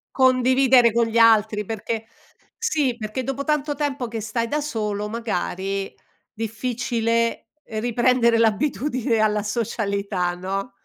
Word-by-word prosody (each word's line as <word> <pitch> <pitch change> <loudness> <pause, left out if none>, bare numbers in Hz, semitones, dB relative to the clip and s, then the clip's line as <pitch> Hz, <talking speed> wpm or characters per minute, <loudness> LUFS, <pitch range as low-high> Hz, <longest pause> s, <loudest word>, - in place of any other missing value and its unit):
Condividere 255 -1 +5
con 235 +1 +2
gli 225 +1 -2
altri, 220 -2 +4
perché 225 +1 -4 0.5
sì, 305 - 0
perché 215 +3 -4
dopo 270 +2 -3
tanto 300 -1 0
tempo 280 -4 -2
che 225 0 -5
stai 230 +2 -2
da 300 +4 -1
solo 210 -7 -3
magari 195 -3 -3 0.4
difficile 230 +1 -1 0.2
riprendere 235 +1 +2
l'abitudine 240 +1 +1
alla 210 -1 +2
socialità, 200 -5 -2
no? 195 +6 -4
230 Hz, 115 wpm, -23 LUFS, 215-255 Hz, 0.5 s, Condividere